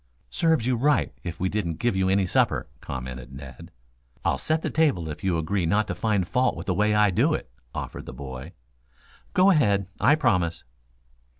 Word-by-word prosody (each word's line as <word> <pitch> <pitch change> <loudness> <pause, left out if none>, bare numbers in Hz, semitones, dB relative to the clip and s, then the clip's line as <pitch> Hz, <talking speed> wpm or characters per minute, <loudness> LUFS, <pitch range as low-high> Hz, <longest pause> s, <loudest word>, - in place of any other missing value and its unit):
"Serve 160 - +2
you 125 0 +2
right 140 +3 +2
if 85 -1 -6
we 95 - +1
didn't 90 -5 -2
give 120 -1 0
you 95 0 +2
any 95 0 +3
supper," 90 - +1
commented 65 +1 -7
Ned. 65 -2 -10 0.6
"I'll - - +1
set 160 0 0
the - - -2
table 120 - +1
if 75 - -7
you 95 -2 +1
will 80 - +1
agree 85 +2 0
not 105 +5 +2
to - - 0
find 105 -5 0
fault 130 +4 +1
with - - -7
the 95 - 0
way 105 +3 +2
I 105 -1 +4
do 90 - +2
it," - - -7 0.2
offered - - -6
the - - -5
boy. 65 +3 -8 0.8
"Go 190 +2 +6
ahead. 100 - +3
I'll 125 +9 +5
promise." 90 - +1
95 Hz, 195 wpm, -25 LUFS, 80-120 Hz, 0.8 s, Go